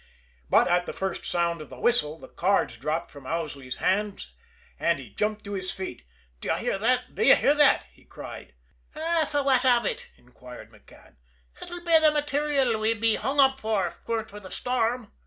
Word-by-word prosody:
But - - +5
at 175 0 +1
the - - -4
first 190 -2 -4
sound 170 -1 0
of 155 - -10
the - - -11
whistle, 160 -11 +1
the - - -12
cards 180 -9 0
dropped 155 +7 -3
from 140 -3 -12
Owsley's 145 -6 -4
hands, 205 +1 -1 0.5
and - - +2
he - - -11
jumped 210 0 -2
to 200 - -7
his 185 -1 -4
feet. 185 - -7 0.3
"D'ye - - -1
hear 195 - -2
that! 250 +3 0
D'ye 275 - +6
hear 285 - +3
that!" 295 0 +4
he - - -24
cried. - - -10 0.4
"An' 320 0 0
fwhat 275 -3 +2
av 240 -3 +4
ut?" - - -3
inquired 125 -2 -13
McCann. 105 -2 -20 0.4
"Ut'll 350 0 -8
be 330 -1 +6
the 315 -1 +5
material 290 -5 +1
we'd 220 +1 +1
be 225 0 +3
hung 275 +5 -2
up 270 -1 +5
for, 215 -5 0
if 170 - -8
'twere 230 -1 -1
not 220 - -14
for 205 - -9
the 190 -2 -11
storm." 245 -1 -1
215 Hz, 195 wpm, -26 LUFS, 170-265 Hz, 0.5 s, D'ye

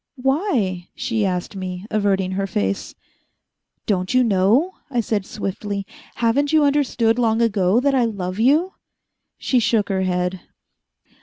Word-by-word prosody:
"Why?" 250 - 0
she 220 -4 -1
asked 180 +2 -3
me, 185 0 -5
averting 195 -3 +1
her 195 +1 -2
face. 100 - -2 0.9
"Don't 185 +2 -1
you 255 - +5
know?" 225 - +3 0.2
I 245 -3 -1
said 210 -3 -1
swiftly. 200 0 -4 0.3
"Haven't 245 +5 +1
you 310 -1 +4
understood 255 -5 +2
long 225 -2 +2
ago 210 -2 +2
that 280 +2 +1
I 255 -3 +3
love 190 -3 -4
you?" 305 +10 +3 0.6
She 255 - +1
shook 215 -2 +1
her 190 -1 0
head. 180 0 -1
215 Hz, 140 wpm, -21 LUFS, 190-250 Hz, 0.9 s, you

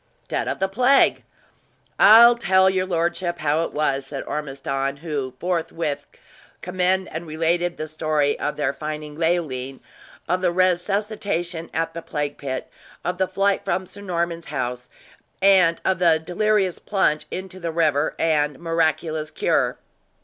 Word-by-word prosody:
"Dead - - -2
of - - -2
the 195 - 0
plague! 250 +7 +3 0.8
I'll 230 +3 +9
tell 190 -5 +3
your 185 0 -1
lordship 175 0 -1
how 155 +1 +1
it - - -7
was," 140 -2 -1
said 135 -1 -5
Ormiston, 135 -1 -3
who 140 -5 -4
forthwith 165 -4 -2 0.6
commend 185 +1 0
and 165 +1 -6
related 170 +2 0
the 155 - -4
story 155 -2 0
of 150 - -2
their 140 -2 0
finding 150 0 -6
Leoline; 150 -6 -1 0.5
of 180 +2 0
the 180 -2 +2
resuscitation 185 -1 -1
at 165 0 -2
the 170 - -6
plague 145 -3 -4
pit; 130 -2 -4 0.4
of 180 +1 -2
the 190 - +2
flight 195 +1 +1
from 185 - -1
Sir 200 +2 -12
Norman's 170 -3 -3
house, 125 -3 -4 0.5
and 185 -4 +5
of 190 -1 +1
the 170 -3 +4
delirious 190 +3 0
plunge 170 -7 0
into 185 0 -7
the 170 -2 -3
river, 155 -3 +1
and 150 -3 +1
miraculous 160 -2 -1
cure. 160 - 0
165 Hz, 145 wpm, -23 LUFS, 150-185 Hz, 0.8 s, I'll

